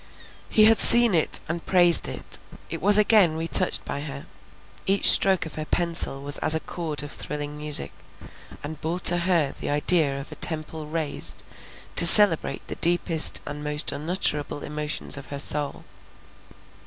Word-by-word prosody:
He 215 - +3
had 225 0 +4
seen 235 -3 +7
it, 160 -3 -2
and 170 +1 -7
praised 175 -2 +3
it; - - -7 0.3
it - - -7
was 205 +3 +3
again 205 -6 +2
retouched 165 -3 +1
by 140 - -7
her, 140 -1 -9 0.6
each 195 +1 +2
stroke 190 -3 +2
of 160 - -11
her 155 - -7
pencil 165 -5 +3
was 145 +1 -3
as 155 - +2
a - - -2
chord 155 -3 -7
of 145 - -10
thrilling 150 0 -7
music, 150 0 -4 0.7
and 150 +1 -10
bore 165 +3 -5
to 175 0 +5
her 170 -5 -1
the - - -6
idea 145 -1 -1
of 140 - -12
a - - -10
temple 155 -1 -4
raised 155 -1 -5 0.5
to 170 - +7
celebrate 170 -9 +4
the - - -7
deepest 170 -1 0
and 150 0 -9
most 150 0 -2
unutterable 150 -1 -3
emotions 150 -1 -4
of 135 - -12
her 140 - -8
soul. 145 0 -3
155 Hz, 165 wpm, -22 LUFS, 145-175 Hz, 0.7 s, seen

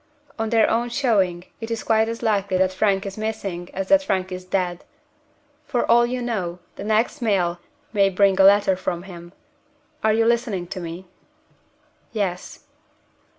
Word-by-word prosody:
On 225 0 -1
their 225 -1 +4
own 235 +2 0
showing, 205 -9 +1 0.2
it 225 - -5
is 230 -1 -3
quite 220 0 +2
as 230 +1 -5
likely 200 -4 +1
that 185 0 +2
Frank 195 +1 +1
is 195 +1 -6
missing 200 -5 -4
as 195 0 -4
that 290 -1 +6
Frank 190 -8 -1
is 185 0 -5
dead. 180 -1 -2 0.8
For 245 -4 0
all 240 +1 +4
you 250 0 -3
know, 190 -8 -2 0.2
the - - -7
next 220 +7 0
mail 180 -6 +1 0.3
may 200 -2 +4
bring 195 0 +3
a - - +7
letter 200 -1 +5
from 175 -1 -3
him. 175 -2 -11 0.7
Are 220 - +4
you 225 +1 +2
listening 230 -6 0
to 185 - -5
me?" 170 +1 -7 1.1
"Yes." 190 -5 -3
200 Hz, 165 wpm, -22 LUFS, 185-225 Hz, 1.1 s, a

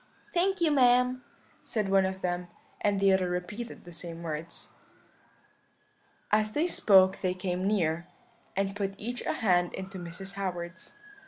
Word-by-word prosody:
"'Thank 380 +1 +2
you, 325 -2 +4
ma'am,' 250 -1 +4 0.4
said 215 -4 -1
one 195 -1 +4
of 190 0 -6
them; 175 0 -1 0.3
and 205 -1 +2
the 195 -1 +5
other 185 -1 +2
repeated 180 +7 -5
the 175 - -11
same 170 0 -7
words. 160 +1 -5 1.6
"As 215 0 +2
they 310 - +2
spoke 190 - +5
they 185 -1 0
came 185 0 -2
near, 170 -4 +1 0.5
and 195 0 0
put 195 -1 -2
each 240 +4 -4
a - - +1
hand 180 -5 +2
into 190 0 -6
Mrs. 180 +3 -8
Howard's. 180 -2 -5
190 Hz, 150 wpm, -29 LUFS, 180-215 Hz, 1.6 s, the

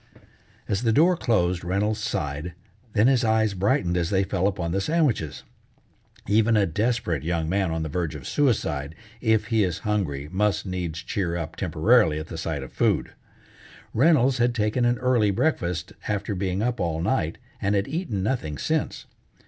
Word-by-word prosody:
As 100 - 0
the 115 -2 +2
door 170 +10 +5
closed 90 - +1
Reynolds 100 +5 0
sighed, 75 -3 -3 0.4
then 105 0 +4
his 130 -1 +4
eyes 110 -2 +2
brightened 95 -2 +1
as 85 -1 0
they 95 -1 +2
fell 95 -1 0
upon 90 -4 -2
the 95 +2 0
sandwiches. 140 - 0 0.8
Even 110 +2 +3
a 100 - +4
desperate 105 - -1
young 80 +1 -1
man 95 +1 +1
on 80 0 -2
the - - -3
verge 80 0 -2
of 70 -5 -8
suicide 80 - 0 0.3
if 110 -3 +2
he 110 -2 +4
is 90 -3 -1
hungry 85 -10 -1
must 105 +2 +1
needs 90 -2 -4
cheer 90 -3 -2
up 80 -3 -5
temporarily 105 -2 +3
at 80 +1 -6
the 80 - -6
sight 80 -4 -3
of 65 - -11
food. - - +1 0.8
Reynolds 130 -1 +4
had 120 0 +2
taken 110 +2 +1
an 120 0 +2
early 125 -5 +2
breakfast 90 - -1
after 105 0 -1
being 95 +1 -1
up 120 0 -1
all 85 -3 -1
night, 85 -3 0 0.2
and 100 +1 +1
had 100 0 0
eaten 135 - -2
nothing 95 - -2
since. - - -2
100 Hz, 175 wpm, -25 LUFS, 85-115 Hz, 0.8 s, door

